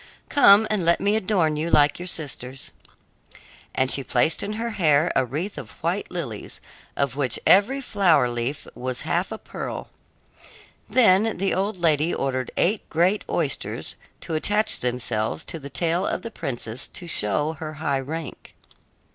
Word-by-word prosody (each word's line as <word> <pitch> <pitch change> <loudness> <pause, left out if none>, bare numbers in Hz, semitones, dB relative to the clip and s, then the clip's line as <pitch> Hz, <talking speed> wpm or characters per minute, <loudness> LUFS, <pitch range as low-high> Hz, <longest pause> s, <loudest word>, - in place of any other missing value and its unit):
"Come, 220 -7 +7
and 210 -4 +1
let 170 +1 +3
me 205 +1 +2
adorn 185 -7 +1
you 160 +2 -1
like 145 -1 +4
your 180 - -6
sisters." 135 -6 -6 1.0
And 130 0 +2
she 135 - +2
placed 135 +5 +1
in 205 - -3
her 230 +2 -3
hair 155 -4 +3
a 135 - +4
wreath 155 - -4
of - - -10
white 175 +5 -1
lilies, 145 - -6 0.4
of 140 -2 0
which 135 -5 +2
every 240 +9 +5
flower 175 - +3
leaf 120 +4 -3
was 130 0 -4
half 170 +4 -1
a 220 - -4
pearl. - - -7 1.0
Then 220 -3 +4
the 195 +2 0
old 195 +2 -1
lady 160 -1 +2
ordered 130 -2 -2
eight 205 +4 +1
great 180 +6 +2
oysters - - -2 0.3
to 165 - -5
attach 210 +7 +1
themselves 120 +1 -2
to 165 - -6
the 140 -1 -8
tail 170 +3 0
of - - -2
the 230 - -6
princess 120 - -5
to 180 - -7
show 150 0 -1
her 155 -1 -5
high 140 -3 -1
rank. 155 +2 -7
160 Hz, 160 wpm, -24 LUFS, 135-195 Hz, 1.0 s, Come